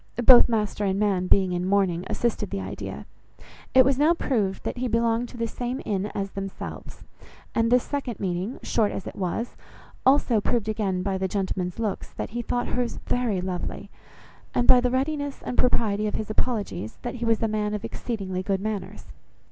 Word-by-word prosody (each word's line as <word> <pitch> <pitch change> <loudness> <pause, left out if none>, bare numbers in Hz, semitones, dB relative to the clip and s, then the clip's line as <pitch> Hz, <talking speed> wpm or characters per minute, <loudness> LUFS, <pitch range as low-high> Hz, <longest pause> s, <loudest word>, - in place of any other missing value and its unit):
Both 250 0 +9
master 210 -2 0
and 195 -1 +1
man 195 -3 +1
being 190 -1 +4
in 175 0 -1
mourning 185 -2 +1
assisted 235 -2 -1
the - - -3
idea. 95 -4 -6 0.7
It 260 -1 +8
was 270 0 +2
now 315 +4 +5
proved 210 - -1
that - - -3
he 255 - 0
belonged 230 +1 +1
to 245 - -11
the 230 - 0
same 245 +3 -3
inn 200 -1 -1
as 195 -1 -2
themselves; 195 -1 -7 0.5
and 230 0 +2
this 250 0 +5
second 275 -6 -4
meeting, 185 +5 -2
short 215 -3 +1
as - - -5
it - - -7
was, 195 +6 -2 0.5
also 260 -5 +4
proved 225 0 0
again 200 -4 -1
by 190 -1 -1
the 190 - 0
gentleman's 185 -2 -2
looks, 220 -4 -3
that - - -5
he 240 +2 -2
thought 245 +1 -1
hers 245 -1 -1
very 230 -7 0
lovely, 180 -1 -4 0.6
and 245 - +3
by 250 - +8
the 250 - +2
readiness 285 +2 -1
and - - -3
propriety 215 -4 +2
of 210 - -3
his 215 0 -3
apologies, 205 - -2
that - - -4
he - - -1
was 225 -1 +2
a - - +3
man 210 -1 -1
of 210 - -4
exceedingly 195 -6 -3
good 195 0 0
manners. 210 0 -4
215 Hz, 190 wpm, -26 LUFS, 190-245 Hz, 0.7 s, Both